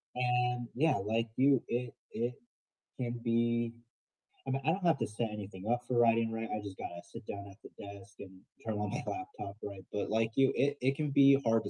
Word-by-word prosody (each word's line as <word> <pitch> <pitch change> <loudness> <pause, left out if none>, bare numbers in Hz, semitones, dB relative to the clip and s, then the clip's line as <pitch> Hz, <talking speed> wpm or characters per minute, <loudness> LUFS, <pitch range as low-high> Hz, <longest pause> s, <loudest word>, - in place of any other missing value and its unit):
and, 125 -1 +1
yeah, 155 +4 +3
like 110 +4 0
you, 135 -1 +5
it 120 -1 -2 0.2
it 120 +2 -1 0.7
can 120 -1 -2
be 115 0 +2 0.7
I 130 - 0
mean, 135 - 0
I - - +4
don't 190 +1 -1
have 165 -5 +5
to - - 0
set 110 +1 -2
anything 100 -1 -7
up 120 0 +2
for 125 -2 +2
writing, 115 -1 +4
right? 115 0 -3
I 105 - -2
just 100 -2 -7
gotta 85 0 -6
sit - - -11
down 100 0 -5
at 100 - -16
the - - -11
desk 100 0 -10
and 95 -2 -8 0.3
turn 110 - -1
on 105 - -1
my - - -3
laptop, 370 - -5
right? 100 -2 -7
But 105 - -2
like 110 +1 +2
you, 135 -1 +5
it 140 +2 +2
it 135 +2 +2
can 150 -1 -1
be 140 0 +7
hard 115 -1 +4
to - - -2
115 Hz, 220 wpm, -33 LUFS, 105-130 Hz, 0.7 s, be